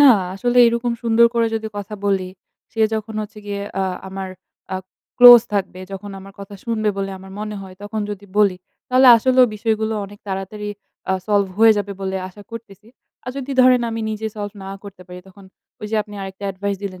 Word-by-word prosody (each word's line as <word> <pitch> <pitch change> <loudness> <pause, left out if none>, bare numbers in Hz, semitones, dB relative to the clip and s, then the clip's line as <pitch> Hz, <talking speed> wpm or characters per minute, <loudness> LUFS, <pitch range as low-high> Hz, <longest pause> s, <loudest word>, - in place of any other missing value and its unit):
না - - +8 0.3
আসলে 245 +5 -1
এইরকম 235 +1 +1
সুন্দর 230 0 +5
করে 230 -1 +3
যদি 220 0 -2
কথা 205 +1 -5
বলি। 190 -2 +1 0.4
সে 225 - -4
যখন 220 0 -4
হচ্ছে 210 0 -10
গিয়ে 200 0 -3
অ্যা 195 - 0 0.2
আমার 190 0 -5 0.5
আ - - 0 0.4
ক্লোজ 245 -1 +11
থাকবে, 190 -2 -2
যখন 200 +1 -7
আমার 195 +1 -12
কথা 200 +1 -9
শুনবে 220 -2 0
বলে 195 0 -2
আমার 190 0 -12
মনে 210 0 -4
হয় 190 -1 -11
তখন 215 +1 -4
যদি 205 0 -7
বলি, 200 -3 +4 0.3
তাহলে 255 +1 +5
আসলেও 255 +2 +4
বিষয়গুলো 220 0 -1
অনেক 205 +1 -12
তাড়াতাড়ি 195 +2 -5 0.4
আ - - +3
solve 200 -2 +2
হয়ে 225 0 +7
যাবে 205 0 -3
বলে 190 0 -2
আশা 205 +2 -14
করতেছি। 220 -2 -11 0.4
আর 250 - -4
যদি 275 0 -5
ধরেন 255 -1 +6
আমি 225 0 -3
নিজে 215 0 -3
solve 205 0 -5
না 190 - -7
করতে 200 -2 -11
পারি, 180 0 -9
তখন 195 +1 -16 0.4
ওই 210 - -5
যে 220 - 0
আপনি 210 0 -13
আরেকটা 195 +1 -8
এডভাইস 200 +1 -3
দিলেন 185 -2 -6
205 Hz, 200 wpm, -20 LUFS, 195-225 Hz, 0.5 s, ক্লোজ